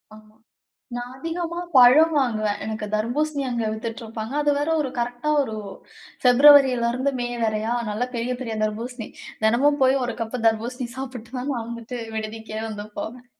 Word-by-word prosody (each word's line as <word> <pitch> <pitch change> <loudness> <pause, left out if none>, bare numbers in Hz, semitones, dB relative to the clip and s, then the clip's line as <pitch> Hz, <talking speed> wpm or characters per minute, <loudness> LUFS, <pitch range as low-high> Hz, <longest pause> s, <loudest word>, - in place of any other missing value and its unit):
ஆமா. 215 0 -18 0.6
நான் 245 +1 -6
அதிகமா 335 +2 -3 0.2
பழம் 285 +7 +7
வாங்குவேன். 215 -5 0
எனக்கு 215 -1 -4
தர்பூசணி 280 +7 0
அங்க 235 -2 -1
வித்துட்ருப்பாங்க. 225 +1 -6
அது 295 - +2
வேற 290 +2 -1
ஒரு 270 -4 -2
கரெக்ட்டா 245 +4 -2
ஒரு, 220 -4 -5 0.7
ஃபிப்ரவரிலருந்து, 260 -1 +6
மே 245 - -1 0.2
வரையா! 220 +1 0 0.2
நல்ல 230 +4 -1
பெரிய 240 +2 -1
பெரிய 225 -3 -4
தர்பூசணி. 225 +2 -4 0.4
தினமும் 275 +6 +3
போயி 260 +1 +5
ஒரு 235 - -3
கப்பு 230 +2 -4
தர்பூசணி 240 +3 0
சாப்பிட்டு 250 -3 -7
தான், 260 +3 -3
நான் 230 -1 -4
வந்துட்டுட்டு 235 +1 -6 0.2
விடுதிக்கே 220 0 -5
வந்து 210 -1 -6
போவேன். 245 +2 -7
240 Hz, 150 wpm, -23 LUFS, 220-265 Hz, 0.7 s, பழம்